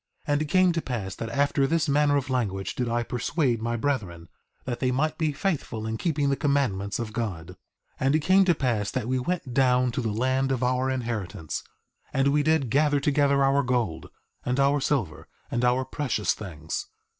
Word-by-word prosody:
3:21 145 - 0
And 145 - +1
it - - 0
came 185 +4 +4
to 165 -1 -1
pass 110 -9 -4
that 115 - -5
after 140 +2 +1
this 165 +2 +1
manner 145 0 +3
of 135 -1 -3
language 95 -7 -1
did 125 -2 -2
I 120 0 0
persuade 125 0 -1
my 115 +1 -1
brethren, 100 -11 -2 0.4
that 120 -2 -3
they 130 - +1
might 155 +5 0
be 155 -2 +1
faithful 140 - -2
in 110 0 -2
keeping 145 -3 0
the - - +2
commandments 130 -10 0
of 115 -2 -5
God. 95 -8 -4
3:22 90 - -10 0.4
And 135 +3 +2
it - - +4
came 185 +5 +5
to 175 -2 +3
pass 115 -8 0
that 125 -3 -3
we 130 +1 0
went 145 -2 -3
down 125 -1 +3
to 130 +2 -2
the 115 - -1
land 130 +4 0
of 130 -2 0
our 130 +1 +1
inheritance, 115 - -3 0.5
and 135 +1 +2
we 145 +1 +3
did 150 -5 +1
gather 145 0 +3
together 140 -1 +2
our 135 +1 +3
gold, 120 - -1 0.3
and 125 +2 -1
our 140 +1 +3
silver, 115 - -1 0.2
and 120 - 0
our 125 +1 +2
precious 125 -8 -1
things. 80 -6 -6
130 Hz, 200 wpm, -26 LUFS, 115-145 Hz, 0.5 s, came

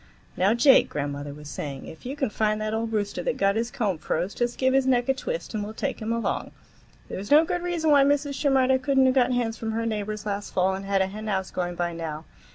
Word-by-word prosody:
"Now, 195 +5 +3
Jake," 265 +3 +6
grandmother 145 0 -4
was 150 +1 -10
saying, 140 -1 -6
"if 160 +9 -10
you 270 - -4
can 270 -6 -1
find 215 0 0
that 215 0 -2
old 225 0 -2
rooster 205 -2 -1
that - - -2
got 195 0 +2
his 230 +1 -1
comb 200 -9 -1
froze, 170 +4 -2
just 240 0 -2
give 260 0 +2
his 270 -1 +3
neck 245 -2 +2
a - - +5
twist, - - -5
and 210 -1 -2
we'll 215 +2 -7
take 270 -1 -3
him 220 +1 -2
along. 230 0 -1 0.6
There's 200 +2 -6
no 305 +3 +7
good 355 +1 -2
reason 345 -3 0
why 285 -1 +7
Mrs. 285 0 +1
Shimerda 265 -2 +3
could 275 +1 0
n't 265 - +6
have 260 - +4
got 255 -1 +3
hens 235 -2 -1
from 225 -1 -3
her 230 +1 -1
neighbors 215 -1 -3
last 205 0 -4
fall 185 +1 +2
and 195 +1 -5
had 195 -1 +2
a - - 0
henhouse 195 -2 -3
going 175 -1 -3
by 175 0 -2
now. 160 -2 -5
220 Hz, 250 wpm, -25 LUFS, 190-265 Hz, 0.6 s, no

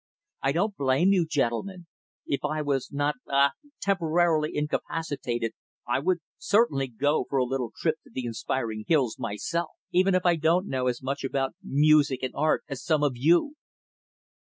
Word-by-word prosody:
I 135 - +2
don't 195 +7 0
blame 140 +6 +3
you, 175 -4 +2
gentlemen 160 +7 -1 0.4
if 140 - -1
I 155 +1 -1
was 140 -3 -1
not 145 +1 0
ah 140 0 +4 0.3
temporarily 170 -4 +2
incapacitated 145 -6 -2 0.3
I 120 - +1
would 175 +3 0 0.2
certainly 200 - +2
go 140 +5 0
for 140 - 0
a 130 - +3
little 125 -2 -2
trip 160 -1 +1
to - - -17
the 130 - -4
inspiring 115 -1 -3
hills 135 -8 +2
myself. 130 +9 -2 0.2
Even 185 +1 +3
if 185 - +1
I 175 -1 +4
don't 165 +4 +2
know 130 -7 -1
as 125 0 -2
much 135 +2 -3
about 135 0 -1
music 145 -2 +3
and 130 - -2
art 155 +2 +1
as 135 0 -6
some 155 -3 +1
of 145 - +3
you." 170 - +3
145 Hz, 165 wpm, -27 LUFS, 130-165 Hz, 0.4 s, ah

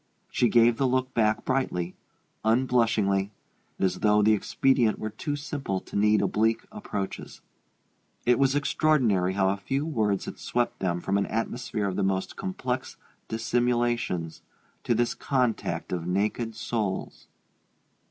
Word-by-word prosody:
She 120 - +2
gave 120 -1 +5
the 135 - +2
look 130 +1 0
back 110 -1 +1
brightly, 90 -10 -1 0.5
unblushingly, 110 -4 +2 0.5
as 90 -1 0
though 105 0 +4
the 110 +1 +5
expedient 120 +2 +2
were 110 - -4
too 145 +7 -3
simple 145 -9 -3
to - - -12
need 105 +1 +4
oblique 110 +2 +1
approaches. 155 - -5 0.9
It 125 0 +4
was 135 0 +3
extraordinary 130 - +2
how 95 -1 +2
a 100 - 0
few 135 +9 -2
words 110 -10 0
had - - -7
swept 120 0 -1
them 90 -2 -1
from 100 +2 +1
an 100 - -1
atmosphere 115 -2 -2
of 95 - -3
the - - +1
most 95 0 -1
complex 130 -10 -4 0.3
dissimulations 120 -6 0 0.4
to 120 - +2
this 120 +1 +1
contact 125 -5 -1
of 85 -1 -3
naked 105 +5 -1
souls. 105 -5 -3
115 Hz, 140 wpm, -27 LUFS, 100-125 Hz, 0.9 s, gave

